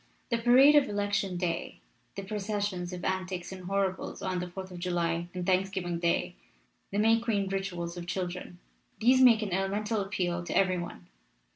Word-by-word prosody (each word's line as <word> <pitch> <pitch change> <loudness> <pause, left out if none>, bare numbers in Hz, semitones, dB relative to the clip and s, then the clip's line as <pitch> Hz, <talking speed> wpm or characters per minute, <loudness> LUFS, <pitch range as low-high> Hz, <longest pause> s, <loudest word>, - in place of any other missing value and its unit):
"The 235 - +2
parade 255 +5 +7
of 290 -2 +5
Election 205 -2 -1
Day, 175 -2 -3 0.4
the 195 - -5
processions 200 -3 -3
of 180 -1 -6
Antics 185 -1 -2
and 185 -1 -8
Horribles 195 0 -2
on 185 -2 -1
the 180 0 -4
Fourth 190 +1 -8
of 180 - -8
July 170 -1 -1
and 180 -1 -4
Thanksgiving 185 -2 0
Day, 170 0 0 0.6
the 200 - -3
May 225 +2 +4
Queen 215 -4 0
rituals 180 -3 -3
of 175 0 -6
children 180 -1 -4 0.4
these 255 +3 +5
make 230 -4 +6
an 195 -4 -3
elemental 205 +3 0
appeal 180 -3 -2
to - - -1
every 185 -2 +3
one. 175 - -7
190 Hz, 170 wpm, -29 LUFS, 175-205 Hz, 0.6 s, parade